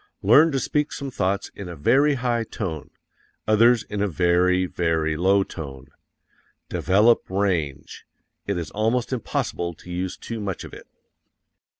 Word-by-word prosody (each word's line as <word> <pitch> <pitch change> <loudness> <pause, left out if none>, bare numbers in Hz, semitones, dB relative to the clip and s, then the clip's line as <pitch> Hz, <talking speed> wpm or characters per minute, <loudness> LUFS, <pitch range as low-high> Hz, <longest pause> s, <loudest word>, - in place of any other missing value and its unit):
Learn 145 +11 +6
to 135 - 0
speak 150 +3 -1
some 140 -1 -5
thoughts 100 -3 -1
in 100 -3 -8
a 85 - -7
very 135 - +3
high 120 -2 0
tone 90 -9 -5 0.6
others 115 +2 +4
in 105 -1 -5
a 105 - +2
very, 90 +2 +2
very 80 -3 0
low 95 +4 +3
tone. 70 -8 -9 0.8
DEVELOP 105 +6 +3
RANGE. 90 -8 -2 0.4
It 100 -2 -1
is 85 -3 -5
almost 115 +4 0
impossible 85 -7 -3
to 90 - -12
use 90 +1 -3
too 115 -1 -6
much 100 -3 -4
of - - -11
it. - - -12
95 Hz, 145 wpm, -23 LUFS, 85-115 Hz, 0.8 s, Learn